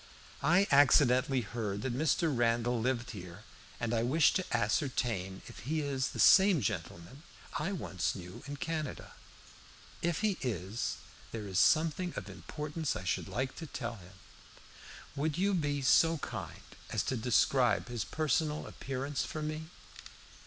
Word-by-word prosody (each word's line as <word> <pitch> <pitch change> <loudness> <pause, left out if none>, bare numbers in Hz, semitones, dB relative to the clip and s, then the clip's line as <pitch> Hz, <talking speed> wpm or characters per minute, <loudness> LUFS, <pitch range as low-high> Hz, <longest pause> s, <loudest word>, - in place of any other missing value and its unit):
I 175 +7 +4
accidentally 135 -2 +5
heard 105 -2 -4
that 130 - -1
Mr. 155 +1 +1
Randall 120 0 +1
lived 125 0 -1
here, 90 -2 -9 0.4
and 120 0 -1
I 115 - +2
wish 145 +6 +4
to 185 - 0
ascertain 105 -4 -1
if - - -11
he 150 +9 -2
is 140 -2 -1
the - - -8
same 190 -3 +7
gentleman 90 - -4 0.4
I 155 +6 -1
once 95 - -2
knew 90 -1 -9
in 145 0 -5
Canada. 155 -2 -4 0.9
If 170 +1 0
he 210 -4 +1
is, 105 -2 -2 0.3
there 110 -3 -5
is 95 -2 0
something 165 +3 +3
of - - -6
importance 150 -1 -4
I - - -5
should 90 - -1
like 130 +7 -3
to 165 - -6
tell 120 - -5
him. 90 0 -14 1.0
Would 150 +2 -1
you 200 +2 +2
be 145 -5 0
so 165 +5 +5
kind - - -6 0.3
as - - 0
to 130 - -1
describe 125 +2 +2
his 120 -4 -3
personal 150 +5 0
appearance 135 0 -3
for 155 - -5
me?" 155 +1 -4
130 Hz, 150 wpm, -32 LUFS, 115-155 Hz, 1.0 s, same